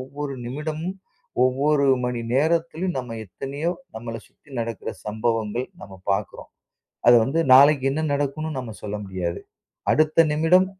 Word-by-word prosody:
ஒவ்வொரு 140 +1 -5
நிமிடமும், 155 +8 -4 0.5
ஒவ்வொரு 140 +3 +2 0.2
மணி 125 -1 -1
நேரத்திலும் 165 +4 +1
நம்ம 120 -3 -5
எத்தனையோ 140 - -3 0.3
நம்மள 115 0 -6
சுத்தி 150 - -26
நடக்குற 115 -3 -4 0.2
சம்பவங்கள், 110 +2 -1 0.2
நம்ம 100 - -10 0.2
பாக்குறோம். 95 - -4 0.6
அது 120 - +9
வந்து 150 +7 0
நாளைக்கு 140 0 +7
என்ன 155 - -1
நடக்கும்னு 145 +2 -2
நம்ம 125 -3 -5
சொல்ல 105 0 -3
முடியாது. 90 -3 -3 0.5
அடுத்த 155 +1 +4
நிமிடம் 165 +5 +4
140 Hz, 130 wpm, -24 LUFS, 115-155 Hz, 0.6 s, அது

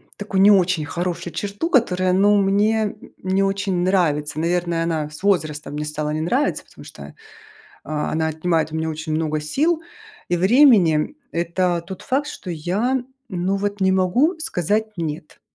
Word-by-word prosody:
такую 200 -2 -1
не 205 - +7
очень 185 -5 +3
хорошую 175 +1 -4
черту, 205 +11 -3
которая, 185 - +2
ну, 205 +2 +4
мне 205 +2 +2 0.3
не 190 +1 +1
очень 195 -1 -1
нравится. 155 -5 +1
Наверное, 170 0 0
она 160 -3 -2
с 150 - -12
возрастом 155 -7 0
мне 150 +1 -3
стала 150 0 -3
не 155 - -2
нравиться, 255 - 0
потому - - -16
что, - - -11 0.7
а, 150 -1 -3
она 160 0 0
отнимает 160 0 0
у - - -5
меня 160 0 -1
очень 155 0 -4
много 155 -1 -1
сил 305 - 0 0.5
и 175 - +1
времени. 195 - +4 0.2
Это 170 0 0
тот 190 0 -8
факт, 280 +3 0
что 185 -10 -7
я, 210 - -1 0.2
ну 185 -1 -1
вот, 205 0 -3
не 190 - +4
могу 195 - +2
сказать 215 - -1
"нет". 155 -2 -5
180 Hz, 160 wpm, -21 LUFS, 160-205 Hz, 0.7 s, не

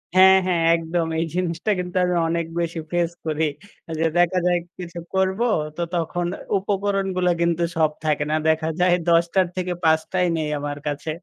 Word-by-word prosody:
হ্যাঁ, 190 0 +8
হ্যাঁ 170 -2 +1
একদম। 165 0 -1
এই 165 - +1
জিনিসটা 180 +3 -1
কিন্তু 180 0 -5
আমি 180 0 0
অনেক 170 0 0
বেশি 170 0 -2
ফেস 175 -1 +1
করি। 155 0 -1 0.6
যে 165 - +2
দেখা 175 +1 +3
যায় 175 -1 +3 0.2
কিছু 175 -1 -7 0.2
করব, 190 +1 +1 0.4
তো - - -2
তখন 175 +1 -1 0.3
উপকরণগুলো 195 -2 0
কিন্তু 170 0 +1
সব 155 -1 +3
থাকে 150 -1 +1
না। 155 - +2
দেখা 160 0 +1
যায় 180 0 +4 0.2
১০ 170 0 +5
টার 190 -2 +3
থেকে 180 -1 -1
৫টাই 160 +3 +2
নেই 155 -1 -2
আমার 145 0 -4
কাছে। 145 +2 -3
175 Hz, 170 wpm, -22 LUFS, 160-185 Hz, 0.6 s, হ্যাঁ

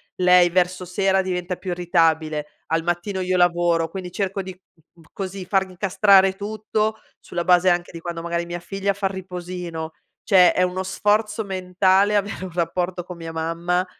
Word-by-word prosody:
lei 180 -1 +5
verso 180 +1 0
sera 190 +2 +1
diventa 180 -1 -3
più 185 -2 -4
irritabile. 160 -4 +1 0.2
Al 165 +1 0
mattino 175 +3 -2
io 185 0 0
lavoro, 175 -2 +2
quindi 180 +1 -6
cerco 195 0 -2
di 190 0 -7 0.4
mhmm, 165 - -20
così 195 -1 -5
far 190 +1 +2
incastrare 190 +1 +4
tutto, 215 +1 -2 0.2
sulla 175 - -4
base 180 +1 +4
anche 175 0 0
di 165 - -8
quando 170 0 -5
magari 170 0 -2
mia 175 0 -5
figlia 195 +3 -2
fa 195 0 -1
il 190 - -5
riposino; 180 -3 -6 0.3
cioè 185 -4 +5
è - - +1
uno 185 +1 0
sforzo 210 +3 0
mentale 190 +1 +2
avere 200 -2 -1
un 185 - -8
rapporto 175 +1 -2
con 180 0 -9
mia 165 -1 -7
mamma, 170 +3 -1
180 Hz, 170 wpm, -22 LUFS, 175-195 Hz, 0.4 s, lei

